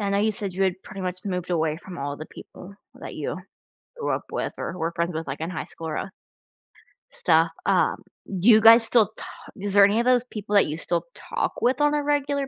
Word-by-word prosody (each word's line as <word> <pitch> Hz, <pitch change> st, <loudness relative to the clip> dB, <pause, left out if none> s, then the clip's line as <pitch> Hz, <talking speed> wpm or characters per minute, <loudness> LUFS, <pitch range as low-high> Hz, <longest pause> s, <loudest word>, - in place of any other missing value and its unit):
I 200 Hz, -1 st, -1 dB
know 200 Hz, -, +1 dB
you 210 Hz, -, +2 dB
had 220 Hz, -, 0 dB
said 200 Hz, -2 st, -4 dB
you 190 Hz, -1 st, +1 dB
pretty 195 Hz, -, -9 dB
much 185 Hz, -1 st, -4 dB
moved 180 Hz, -3 st, -3 dB
away 160 Hz, -3 st, 0 dB
from 175 Hz, +2 st, -10 dB
all 140 Hz, 0 st, -4 dB
the 155 Hz, -, -8 dB
people 195 Hz, +2 st, -12 dB, 0.2 s
that -, -, -8 dB
you -, -, -4 dB, 0.6 s
grew 475 Hz, -, -3 dB
up -, -, -2 dB
with -, -, -2 dB
or -, -, -4 dB
were 165 Hz, -1 st, -2 dB
friends 170 Hz, 0 st, -1 dB
with, 160 Hz, +1 st, -4 dB
like, 135 Hz, +3 st, -5 dB
in 165 Hz, +2 st, -3 dB
high 185 Hz, -, -4 dB
school 165 Hz, -, -8 dB
or, 155 Hz, -, -3 dB
uh -, -, -4 dB, 1.0 s
stuff, 165 Hz, -1 st, +2 dB, 0.2 s
um, -, -, +2 dB, 0.4 s
do 195 Hz, +7 st, +4 dB
you 220 Hz, -2 st, +8 dB
guys 225 Hz, +1 st, +8 dB
still 225 Hz, -1 st, +4 dB
ta -, -, -8 dB, 0.3 s
is 200 Hz, 0 st, -4 dB
there 200 Hz, 0 st, +8 dB
any 205 Hz, +2 st, +2 dB
of -, -, +2 dB
those 250 Hz, -1 st, +3 dB
people 210 Hz, -3 st, -4 dB
that 200 Hz, -, +6 dB
you 150 Hz, -, -3 dB
still 170 Hz, 0 st, -2 dB
talk -, -, -3 dB
with 255 Hz, +3 st, +2 dB
on 295 Hz, 0 st, +3 dB
a 295 Hz, -1 st, 0 dB
regular 285 Hz, -1 st, 0 dB
195 Hz, 240 wpm, -24 LUFS, 170-225 Hz, 1.0 s, you